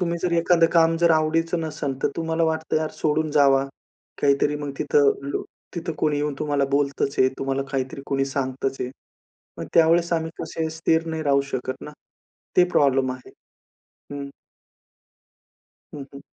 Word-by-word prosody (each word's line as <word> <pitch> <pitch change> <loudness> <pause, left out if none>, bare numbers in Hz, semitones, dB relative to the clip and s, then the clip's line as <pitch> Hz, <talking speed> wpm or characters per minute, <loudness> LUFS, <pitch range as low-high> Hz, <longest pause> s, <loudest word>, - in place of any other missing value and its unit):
तुम्ही 170 -1 -1
जर 175 -1 0
एखादं 170 0 +4
काम 165 -1 +4
जर 170 -1 +5
आवडीचं 165 +2 +1
नसेल, 145 -3 -3
तर - - +3
तुम्हाला 165 0 -1
वाटतं 160 0 -1
यार 155 0 -1
सोडून 155 0 +1
जावा. 135 -2 +4 0.6
काहीतरी 145 +1 +3
मग 145 -1 -5
तिथं 145 -1 +4 0.2
लो - - -2 0.3
तिथं 170 -1 -3
कोणी 150 -2 +1
येऊन 145 -1 -1
तुम्हाला 145 -2 0
बोलतचं 140 -1 0
आहे, 130 - +5
तुम्हाला 135 0 -1
काहीतरी 135 +1 -3
कोणी 135 0 0
सांगतचं 135 -1 -3
आहे. 125 - -6 0.7
मग - - -5
त्यावेळेस 170 +1 +4
आम्ही 160 -1 0
कसे 160 0 -3
स्थिर 165 0 +1
नाही 160 -1 -3
राहू 140 -2 +3
शकत 130 0 -2
ना. - - -7 0.7
ते 180 - +7
प्रॉब्लेम 135 -2 +3
आहे, 130 -1 -11 0.8
हं. 140 0 -5 1.7
हं, 145 -2 -6
हं. 140 - -9
150 Hz, 160 wpm, -23 LUFS, 140-165 Hz, 1.7 s, ते